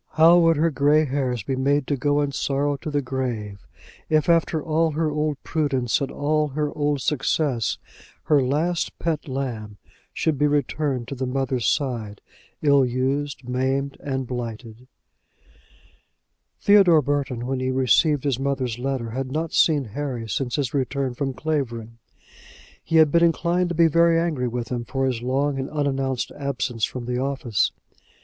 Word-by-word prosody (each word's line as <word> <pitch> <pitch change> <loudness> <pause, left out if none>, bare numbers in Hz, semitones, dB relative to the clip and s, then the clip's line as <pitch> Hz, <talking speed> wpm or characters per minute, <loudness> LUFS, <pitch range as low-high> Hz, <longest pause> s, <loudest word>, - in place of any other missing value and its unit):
How 165 +2 +6
would 165 -2 +4
her 165 +2 +2
gray 145 +3 +3
hairs 130 -5 -2
be 135 - -2
made 140 +2 +1
to 145 - 0
go 145 +2 +1
in 145 -1 -1
sorrow 140 +1 0
to 155 - -6
the 145 -1 -1
grave, 120 -6 -4 0.4
if, 155 +1 +2
after 165 -1 +3
all 160 +1 0
her 155 0 0
old 150 -1 -1
prudence 135 -7 0
and 135 - -1
all 150 +1 0
her 150 +1 -3
old 145 -2 0
success, 135 -4 0 0.5
her 145 -2 +3
last 155 +6 -1
pet 160 -3 -2
lamb 120 -6 -4 0.3
should 155 -4 -1
be 150 - +4
returned 145 -3 -1
to - - -4
the 130 -1 -3
mother's 130 -1 -1
side, 115 -8 -1 0.4
ill 140 -2 +5
used, 130 +1 -2
maimed, 135 +2 -1
and 130 -2 -3
blighted! 120 -1 -7 1.7
Theodore 190 -7 +5
Burton, 140 -4 -2
when 130 0 -2
he 130 0 -1
received 130 +3 +3
his 135 -4 0
mother's 135 -4 -2
letter, 130 -3 -2
had 130 +2 -4
not 160 +2 -2
seen 150 -4 +4
Harry 120 0 -4
since 120 +4 -2
his 140 -5 -2
return 135 -1 -1
from 135 +1 -3
Clavering. 120 -7 -3 0.8
He 165 - -2
had 160 -2 +6
been 170 +2 +4
inclined 170 +1 +2
to 175 - -3
be 165 +1 +5
very 170 +1 +4
angry 155 -7 -1
with 120 -1 -4
him 120 -1 -2
for 135 +2 -2
his 125 -3 -1
long 135 +3 0
and 130 - -3
unannounced 135 -3 -1
absence 125 -5 -1
from 125 -2 -7
the 125 0 -2
office. 130 -5 0
140 Hz, 165 wpm, -23 LUFS, 125-150 Hz, 1.7 s, How